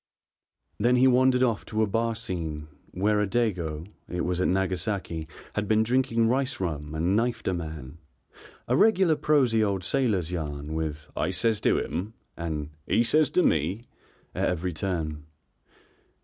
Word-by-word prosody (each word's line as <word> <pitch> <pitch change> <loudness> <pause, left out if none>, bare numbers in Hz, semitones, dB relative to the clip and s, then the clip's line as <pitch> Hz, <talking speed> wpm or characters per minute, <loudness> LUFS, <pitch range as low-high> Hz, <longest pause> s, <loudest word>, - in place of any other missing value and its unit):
Then 120 +4 +3
he 125 +1 +5
wandered 130 0 +4
off 115 -5 +1
to 110 0 0
a - - +4
bar 115 +2 0
scene 80 -9 -4 0.2
where 105 +3 +1
a 105 - +1
dago 90 -9 -1 0.2
it 90 0 -2
was 90 +1 -1
at - - +2
Nagasaki 95 -3 -1 0.3
had 105 0 -2
been 110 +1 +3
drinking 115 -1 +2
rice 130 +2 0
rum 75 -4 -3
and 85 +5 +1
knifed 115 0 0
a 95 - +2
man, 80 -3 -6 0.7
a 125 - +2
regular 190 -2 +4
prosy 130 -8 +3
old 100 -3 -1
sailor's 100 -7 0
yarn, 75 -3 -4
with 75 -1 -3
"I 80 - 0
says 110 +4 0
to - - +3
him," 105 +6 -3 0.2
and 80 -3 -4 0.2
"he 115 - +3
says 150 +6 +3
to 180 - +2
me" 85 +9 +1 0.5
at - - 0
every 90 0 -2
turn. 80 -4 -3
95 Hz, 160 wpm, -27 LUFS, 80-115 Hz, 0.7 s, he